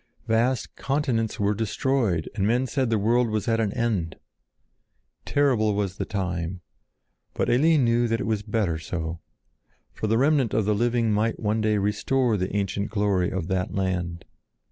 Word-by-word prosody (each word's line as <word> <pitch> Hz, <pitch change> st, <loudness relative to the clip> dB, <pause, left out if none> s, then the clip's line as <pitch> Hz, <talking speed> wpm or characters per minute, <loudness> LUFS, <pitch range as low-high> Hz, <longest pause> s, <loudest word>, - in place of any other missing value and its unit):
Vast 115 Hz, +2 st, 0 dB
continents 130 Hz, -6 st, -1 dB
were 100 Hz, 0 st, +2 dB
destroyed, 110 Hz, -3 st, 0 dB
and 100 Hz, -2 st, 0 dB
men 120 Hz, +4 st, +2 dB
said 130 Hz, -1 st, -1 dB
the 115 Hz, -, +2 dB
world 115 Hz, +3 st, +2 dB
was 110 Hz, -2 st, -2 dB
at 115 Hz, -1 st, +2 dB
an 110 Hz, -3 st, +1 dB
end. 100 Hz, -9 st, -1 dB, 1.1 s
Terrible 120 Hz, -8 st, +2 dB
was 100 Hz, -2 st, -2 dB
the -, -, -2 dB
time, 90 Hz, -3 st, -3 dB, 0.7 s
but -, -, 0 dB
Eline 150 Hz, +3 st, +4 dB
knew 120 Hz, 0 st, +2 dB
that 115 Hz, 0 st, 0 dB
it -, -, -2 dB
was 110 Hz, -2 st, 0 dB
better 100 Hz, -7 st, -1 dB
so; 80 Hz, 0 st, -4 dB, 0.7 s
for 110 Hz, -, -3 dB
the 110 Hz, +1 st, +2 dB
remnant 140 Hz, -2 st, +2 dB
of 110 Hz, -2 st, +2 dB
the 105 Hz, -, +2 dB
living 115 Hz, +1 st, +1 dB
might 110 Hz, +2 st, 0 dB
one 110 Hz, 0 st, 0 dB
day 110 Hz, -1 st, +2 dB
restore 110 Hz, +4 st, +1 dB
the 95 Hz, 0 st, -2 dB
ancient 100 Hz, 0 st, -1 dB
glory 100 Hz, -4 st, +1 dB
of 95 Hz, -3 st, -3 dB
that 95 Hz, +2 st, -2 dB
land. 90 Hz, -3 st, -2 dB
110 Hz, 165 wpm, -25 LUFS, 95-120 Hz, 1.1 s, Eline